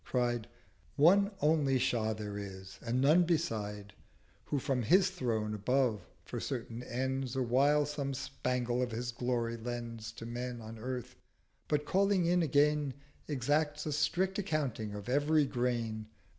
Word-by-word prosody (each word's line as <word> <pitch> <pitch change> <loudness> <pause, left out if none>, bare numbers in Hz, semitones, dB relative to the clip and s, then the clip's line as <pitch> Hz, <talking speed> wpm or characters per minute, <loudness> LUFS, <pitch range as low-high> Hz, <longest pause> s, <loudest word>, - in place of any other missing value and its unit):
cried— 120 -3 0 0.5
'One 195 +7 +6
only 150 -3 +3
Shah 115 -3 +1
there 105 -1 -5
is, 95 -1 -8
and 120 +2 0
none 155 +6 +6
beside, 105 - -2 0.5
Who 145 - -1
from 135 -2 0
his 185 - +4
Throne 115 - -1
above 115 +1 +1 0.2
for - - -5
certain 115 +1 -4
Ends 130 +1 -2
Awhile 135 +4 +3
some 140 -2 -3
Spangle 125 -2 -1
of 125 - 0
his 120 +2 -3
Glory 120 -1 -1
lends 115 -1 -5
To 115 - -8
Men 120 +1 -4
on 110 0 -9
Earth; 125 +1 -5 0.5
but 150 -1 0
calling 195 +2 +3
in 175 +1 +3
again 150 -2 +3 0.3
450 150 - -3
Exacts 150 +3 0
a 155 - -1
strict 185 +6 +1
account 155 - -1
of 105 -1 -5
every 145 +3 +3
Grain. 120 -4 -1
125 Hz, 145 wpm, -33 LUFS, 115-150 Hz, 0.5 s, One